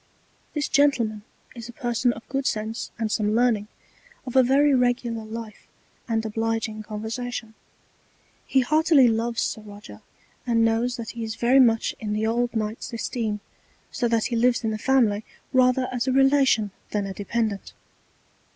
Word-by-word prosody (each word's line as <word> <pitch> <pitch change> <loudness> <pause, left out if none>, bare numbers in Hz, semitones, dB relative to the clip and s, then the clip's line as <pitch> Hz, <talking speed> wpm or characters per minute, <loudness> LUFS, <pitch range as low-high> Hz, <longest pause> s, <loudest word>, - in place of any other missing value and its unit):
This 295 -2 0
Gentleman 240 -7 +2 0.3
is 235 0 -8
a - - -9
Person 240 -2 0
of 230 - -12
good 270 0 -2
Sense 220 +1 -3
and 220 -2 -2
some 215 -1 +1
Learning, 230 -4 +2 0.6
of 250 - -7
a 260 - +8
very 275 +3 +4
regular 245 -3 0
Life 220 -1 -8 0.4
and 225 -1 -1
obliging 225 0 -2
Conversation: 220 +2 -5 0.9
He 265 - +3
heartily 305 0 +4
loves 230 +1 0
Sir 220 - -3
Roger, 205 - -12 0.5
and 230 -1 +3
knows 230 +2 +1
that 230 -2 -6
he 235 -1 -6
is 220 0 -4
very 250 +3 +4
much 230 -3 +3
in 210 -1 -3
the 215 +1 0
old 240 +2 0
Knight's 215 +2 -3
Esteem, 225 -2 -3 0.5
so 245 -3 0
that 230 -1 +1
he 240 - -2
lives 235 +1 +2
in 220 - 0
the 215 - -4
Family 230 -4 +2 0.3
rather 255 0 +3
as 245 0 -2
a - - +2
Relation 270 -5 +3 0.2
than 205 -1 -1
a 195 - -5
Dependent. 210 0 -3
230 Hz, 160 wpm, -24 LUFS, 220-250 Hz, 0.9 s, a